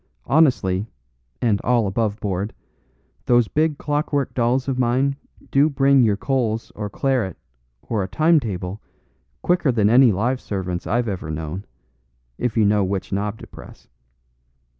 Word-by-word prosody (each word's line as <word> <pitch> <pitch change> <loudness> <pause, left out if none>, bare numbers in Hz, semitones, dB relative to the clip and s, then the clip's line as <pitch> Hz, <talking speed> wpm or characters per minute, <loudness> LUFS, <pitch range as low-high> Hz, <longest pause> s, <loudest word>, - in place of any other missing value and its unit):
Honestly, 115 - +2 0.6
and 105 -4 +2
all 120 -2 +2
above 105 +1 -1
board, 100 +1 -3 0.7
those 120 -2 +4
big 155 +2 0
clockwork 145 -1 -1
dolls 125 +2 +1
of 130 -2 -1
mine 130 +3 +1 0.4
do 140 +3 +4
bring 140 -1 +4
your 105 -4 +2
coals 115 -3 -1
or 105 -1 -5
claret 125 - -1 0.5
or 110 -3 -2
a 95 - -2
timetable 110 - 0 0.6
quicker 175 -6 +2
than 110 -3 +2
any 125 0 +6
live 120 +7 -1
servants 90 -3 -4
I've 120 +2 0
ever 95 -6 -4
known, 80 +5 -5 0.7
if 120 -3 -1
you 110 - +4
know 105 0 +3
which 95 0 -3
knob 105 +2 -2
to - - -8
press. - - -14
115 Hz, 140 wpm, -22 LUFS, 100-135 Hz, 0.7 s, any